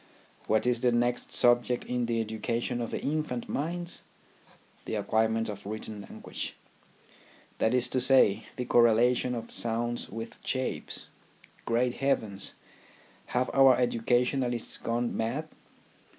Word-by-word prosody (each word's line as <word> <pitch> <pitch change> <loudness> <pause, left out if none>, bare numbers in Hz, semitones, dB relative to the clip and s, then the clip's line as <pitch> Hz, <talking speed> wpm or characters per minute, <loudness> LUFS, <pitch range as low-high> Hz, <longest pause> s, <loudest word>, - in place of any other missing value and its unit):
What 110 +2 +2
is 125 -1 +2
the 125 -1 +3
next 120 +1 0
subject 120 0 +3
in 125 -1 -1
the 115 -1 0
education 115 +2 -2
of 115 - -3
the - - -3
infant 150 -5 -2
minds? 170 +4 -3 0.8
The - - -3
acquirement 110 0 +1
of 105 -2 -6
written 105 -1 -6
language; - - -6 1.0
that 110 - +3
is 125 -1 +3
to 130 - +1
say, 130 -6 +5
the 125 - -3
correlation 120 +1 +4
of 115 -1 -6
sounds 120 +1 -1
with 115 +2 -7
shapes. 130 -1 -3 0.6
Great 120 +1 +1
heavens! 110 -8 -1 0.7
Have 125 +1 0
our 135 -2 +7
educa 120 0 +2
tionists 125 -2 -1
gone 120 +1 -1
mad 130 +8 -2
120 Hz, 130 wpm, -29 LUFS, 115-125 Hz, 1.0 s, our